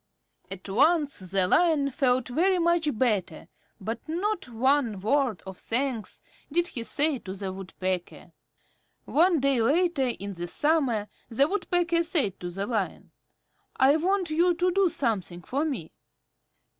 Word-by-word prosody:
At 195 0 -8
once 290 - +2
the 185 0 0
Lion 305 - +3
felt 255 -2 +1
very 365 +9 +2
much 340 -2 +2
better, 205 -10 -1 0.3
but 225 +4 -4
not 360 -1 -2
one 240 -2 +1
word 235 - 0
of 190 -1 -8
thanks 245 -2 -2 0.3
did 345 +3 +1
he 240 - -4
say 285 +4 +1
to 190 -3 -7
the 190 -1 -5
Woodpecker. 185 -1 -5 0.7
One 340 +1 +3
day 270 -3 +2
later 305 +2 +2
in 200 -4 -4
the 175 -1 -6
summer, 270 - +1 0.2
the 270 +5 +3
Woodpecker 350 -2 0
said 305 - 0
to 175 - -5
the 195 +3 -4
Lion, 215 -4 -3 0.6
"I 270 +2 +5
want 365 +1 0
you 345 +3 +3
to 360 +2 +1
do 385 0 +3
something 190 - -3
for 280 +4 -1
me." 255 - -4
270 Hz, 145 wpm, -27 LUFS, 200-330 Hz, 0.7 s, I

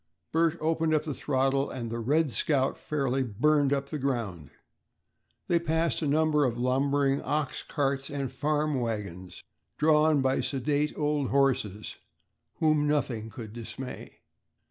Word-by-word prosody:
Bert 165 +1 +2
opened 160 0 +1
up 155 - +1
the 155 - -3
throttle 135 0 0
and 120 -3 -5
the 115 - -3
"Red 145 +5 +1
Scout" 135 +4 +1
fairly 135 -3 -1
"burned 140 +5 +2
up 140 0 -1
the 150 - -4
ground." 110 - -2 1.0
They 170 - +3
passed 165 0 0
a 155 - 0
number 150 0 +3
of 120 -3 0
lumbering 135 +2 +1
ox 150 -2 -2
carts 140 -2 -1
and 140 -3 -3
farm 150 +1 0
wagons 100 -6 -5 0.3
drawn 150 -2 +4
by 130 0 +2
sedate 145 +2 -1
old 150 -3 0
horses, 125 -7 0 0.6
whom 155 -2 +2
nothing 125 -7 -1
could 110 -2 -9
dismay. 120 +2 -8
140 Hz, 140 wpm, -28 LUFS, 125-150 Hz, 1.0 s, drawn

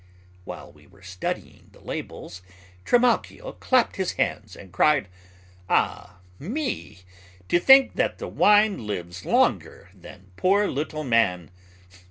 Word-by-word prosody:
While - - -9
we - - -22
were 95 - -22
studying 90 0 -6
the - - -19
labels, 90 0 -8 0.4
Trimalchio 250 - +1
clapped 255 -2 +1
his 190 -2 -2
hands 105 -4 -3
and 95 -3 -14
cried, 150 -8 +2 0.6
"Ah 90 - -1 0.2
me! 245 - -5 0.5
To 175 - +3
think 265 +7 +6
that - - -1
wine 210 - +2
lives 90 -3 -6
longer - - 0
than 95 0 -15
poor 200 +3 +2
little 155 +2 -4
man. 100 - 0
145 Hz, 120 wpm, -24 LUFS, -, 0.6 s, think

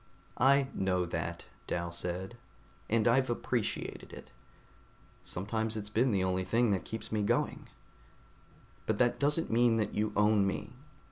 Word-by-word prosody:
"I 135 +1 +5
know 90 -2 0
that," 85 - -4 0.2
Dal 85 0 -2
said, 90 +5 -4 0.5
"and 115 +1 +2
I've 130 +2 +3
appreciated 120 -2 -3
it. - - -11 0.9
Sometimes 110 +4 -2
it's 105 -1 -6
been 120 +5 +3
the 100 -4 +1
only 95 0 0
thing 115 +4 +2
that's 95 -4 -2
kept 110 - -6
me 110 -1 0
going. 100 - 0 1.2
But 110 - +1
that 120 +1 +2
doesn't 150 +3 +1
mean 115 0 +4
that 105 -2 -1
you 105 +1 0
own 105 -1 +4
me. 95 - -4
110 Hz, 145 wpm, -31 LUFS, 95-120 Hz, 1.2 s, I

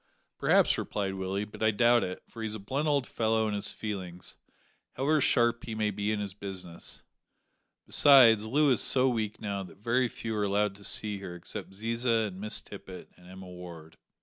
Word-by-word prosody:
"Perhaps," - - +3
replied 100 -2 -3
Willie, 95 +2 -3
"but 105 - -13
I 110 - +4
doubt 120 +2 +4
it, 90 0 -5
for 115 - -10
he's 110 -1 -2
a - - -6
blunt 135 +10 -2
old 140 -3 +2
fellow 110 -1 0
in 105 - -2
his 100 0 -1
feelings, 95 -4 -6 0.6
however 145 +3 +1
sharp 120 -2 +2
he 115 - -5
may 105 -1 0
be 105 +1 -2
in 110 - -1
his 100 -2 -4
business; 95 -4 -8 0.8
besides, 115 -7 +6
Loo 145 +4 +3
is 120 - +5
so 130 0 +5
weak 110 -4 -2
now 100 -2 -3
that 95 0 -11
very 120 +5 +1
few 115 -1 -5
are 105 - 0
allowed 100 0 +1
to 100 - -14
see 105 0 -1
her 90 -3 -7
except 85 - -7
Ziza, 115 +2 0
and 95 -1 -9
Miss 105 0 -1
Tippet, 95 -3 -11
and 90 - -18
Emma 95 +1 -11
Ward." 85 -3 -11
105 Hz, 195 wpm, -29 LUFS, 95-115 Hz, 0.8 s, besides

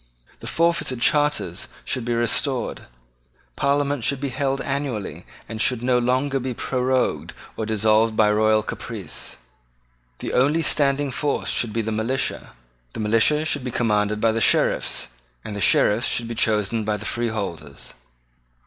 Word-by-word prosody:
The - - -8
forfeited 165 -7 +1
charters 145 - +2 0.2
should 120 - -2
be 120 0 0
restored. 120 +3 0 0.7
Parliament 140 -2 0
should 140 +2 0
be 140 0 -2
held 135 +1 -1
annually, 135 -7 -4 0.2
and 110 -1 -5
should 125 -1 +1
no 125 -1 +3
longer 130 +3 0
be 130 -1 -4
prorogued 130 +1 -1 0.2
or 110 - -4
dissolved 110 +1 +2
by 105 -1 +4
royal 110 0 +3
caprice. - - -7 0.8
The - - -5
only 145 +6 +2
standing 140 -2 +2
force 145 +3 -1
should 115 - 0
be 115 +1 -1
the 110 - -3
militia: 115 +5 -2 0.4
the - - -7
militia 115 +8 +2
should 145 -4 -1
be 125 - -3
commanded 105 -3 0
by 115 +1 +3
the 115 +1 -1
Sheriffs; - - +2 0.4
and 105 - -5
the 100 - -4
Sheriffs 105 +6 +3
should 115 - 0
be 115 - -4
chosen 110 0 +1
by 105 0 -1
the 105 - -9
freeholders. 100 -12 -4
120 Hz, 150 wpm, -23 LUFS, 110-135 Hz, 0.8 s, by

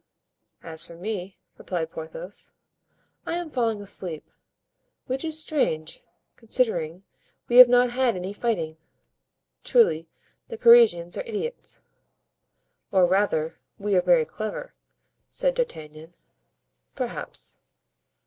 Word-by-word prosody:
"As 160 -1 -2
for 170 - -11
me," 190 0 -5 0.2
replied 165 -3 -3
Porthos, 165 +4 -7 0.7
"I - - -3
am 345 -3 -4
falling 230 -5 0
asleep, 180 -5 -4 0.8
which 260 +1 -3
is 315 -1 -2
strange, 165 - -1 0.4
considering 195 -8 -1 0.4
we 240 - +3
have 250 -1 +12
not 245 0 +4
had 250 -2 +1
any 185 +2 -4
fighting; 175 -9 -2 0.9
truly 165 - +3 0.4
the 460 - -7
Parisians 225 - +6
are - - -2
idiots." 460 +2 -5 1.1
"Or 185 -2 +5
rather, 175 -4 +1 0.2
we 205 0 -2
are 180 - +5
very 175 -3 +4
clever," 215 - -6 0.6
said - - +1
D'Artagnan. 160 - -5 0.8
"Perhaps." - - -5
200 Hz, 110 wpm, -25 LUFS, 165-250 Hz, 1.1 s, have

